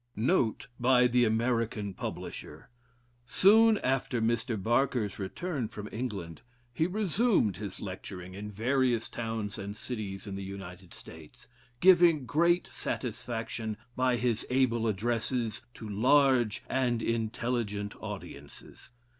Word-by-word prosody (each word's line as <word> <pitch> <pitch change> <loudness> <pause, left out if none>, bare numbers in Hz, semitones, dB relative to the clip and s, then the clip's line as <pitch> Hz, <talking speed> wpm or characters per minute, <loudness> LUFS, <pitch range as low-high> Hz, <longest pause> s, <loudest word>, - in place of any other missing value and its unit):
J. 105 - -5
W. - - +3
Note 115 -8 +1
by 125 0 +5
the 125 0 +4
American 115 -2 0
Publisher. - - -7 0.6
Soon 220 - +6
after 130 -3 0
Mr. 115 0 0
Barker's 120 0 +1
return 130 - -3
from 105 -1 -8
England, 100 -9 -5 0.3
he 160 +7 +1
resumed 195 - +1
his 100 -3 -6
lecturing 95 -1 -7
in 105 +2 -6
various 120 +2 +1
towns 110 -2 -4
and 100 +1 -6
cities 105 -6 -5
in 100 - -6
the 100 - -5
United 95 -2 -9
States, 80 -2 -13 0.3
giving 175 -6 +6
great 170 +6 +3
satisfaction, 115 -2 -4 0.2
by 125 -1 +2
his 120 -2 0
able 125 -3 +2
addresses, 115 +2 -1
to 110 - -8
large 125 +1 +3
and 125 -3 0
intelligent 115 -2 -2
audiences. - - -9
115 Hz, 120 wpm, -30 LUFS, 105-130 Hz, 0.6 s, Soon